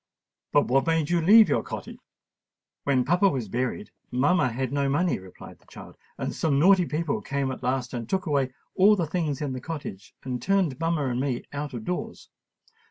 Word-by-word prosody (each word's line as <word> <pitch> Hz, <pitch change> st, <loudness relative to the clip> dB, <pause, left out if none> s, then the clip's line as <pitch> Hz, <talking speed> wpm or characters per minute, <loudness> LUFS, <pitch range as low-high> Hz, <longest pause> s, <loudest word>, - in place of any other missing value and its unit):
"But 145 Hz, -, +4 dB
what 135 Hz, +3 st, +2 dB
made 165 Hz, -1 st, +1 dB
you 175 Hz, -1 st, +2 dB
leave 215 Hz, +6 st, +7 dB
your -, -, +1 dB
cottage?" -, -, -8 dB, 0.9 s
"When 130 Hz, -3 st, +2 dB
papa 180 Hz, +5 st, +3 dB
was 130 Hz, -, -3 dB
buried, 125 Hz, -, -3 dB, 0.2 s
mamma 140 Hz, +2 st, +2 dB
had 130 Hz, +2 st, -3 dB
no 140 Hz, -1 st, +1 dB
money," 170 Hz, -, +1 dB
replied 95 Hz, -1 st, -13 dB
the -, -, -29 dB
child; -, -, -12 dB, 0.2 s
"and -, -, -3 dB
some 150 Hz, -4 st, 0 dB
naughty 180 Hz, +3 st, +5 dB
people 155 Hz, -1 st, -2 dB
came 140 Hz, -1 st, -2 dB
at 130 Hz, -, -7 dB
last 130 Hz, 0 st, -2 dB
and 120 Hz, -2 st, -5 dB
took 190 Hz, 0 st, -1 dB
away 140 Hz, -5 st, 0 dB, 0.2 s
all 200 Hz, +3 st, +5 dB
the 175 Hz, -4 st, -1 dB
things 155 Hz, -3 st, -2 dB
in 140 Hz, -3 st, -2 dB
the 130 Hz, -, -5 dB
cottage, 145 Hz, -, -7 dB
and 125 Hz, -2 st, -4 dB
turned 180 Hz, -5 st, +1 dB
mamma 165 Hz, -3 st, 0 dB
and 125 Hz, -1 st, -1 dB
me 130 Hz, -3 st, -2 dB
out 145 Hz, -2 st, -4 dB
of 110 Hz, -2 st, -6 dB
doors. 180 Hz, -, -5 dB
145 Hz, 195 wpm, -26 LUFS, 130-170 Hz, 0.9 s, leave